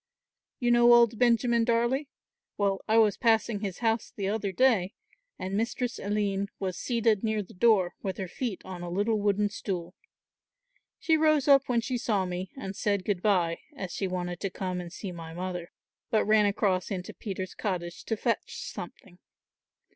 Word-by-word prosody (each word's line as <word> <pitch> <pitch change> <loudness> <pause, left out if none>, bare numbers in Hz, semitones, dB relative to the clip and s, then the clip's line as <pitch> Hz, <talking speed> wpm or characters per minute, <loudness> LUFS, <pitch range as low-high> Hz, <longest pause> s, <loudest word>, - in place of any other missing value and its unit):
You 240 -2 +2
know 240 0 +6
old 235 -2 +4
Benjamin 235 -1 +3
Darley? 240 +5 +1 0.5
Well, 200 -1 +1
I 220 +1 +3
was 215 -3 +4
passing 225 -2 +2
his 195 -3 -4
house 225 0 +1
the 195 -2 -2
other 205 -2 -1
day, 215 -4 +2 0.4
and 190 +1 -4
Mistress 235 +3 -1
Aline 200 -1 -1
was 185 -2 -3
seated 230 -2 +1
near 220 -1 0
the - - -15
door 190 -3 +3
with 190 -2 -3
her 190 - -4
feet 220 +2 -4
on 185 -2 -7
a 175 - -5
little 205 +4 0
wooden 205 0 +1
stool. 180 -4 -4 1.0
She 320 -1 +2
rose 310 -3 +3
up 275 -1 +5
when 240 -2 +2
she 250 +1 -2
saw 210 -5 0
me 180 +1 -4
and 195 -7 -6
said 200 -2 0
good 200 -4 -1
bye, 180 -5 +2 0.2
as 185 -8 -5
she 195 - -2
wanted 180 -1 -3
to 195 - -2
come 185 -1 -3
and 175 -1 -8
see 190 +1 -6
my 165 -1 -8
mother; 180 -1 -4 0.4
but 220 - +2
ran 215 -1 +4
across 200 -3 0
into 185 -2 -5
Peter's 190 -3 -5
cottage 175 -4 -4
to 225 - -1
fetch - - -1
something. 180 -2 -9
205 Hz, 175 wpm, -28 LUFS, 185-230 Hz, 1.0 s, know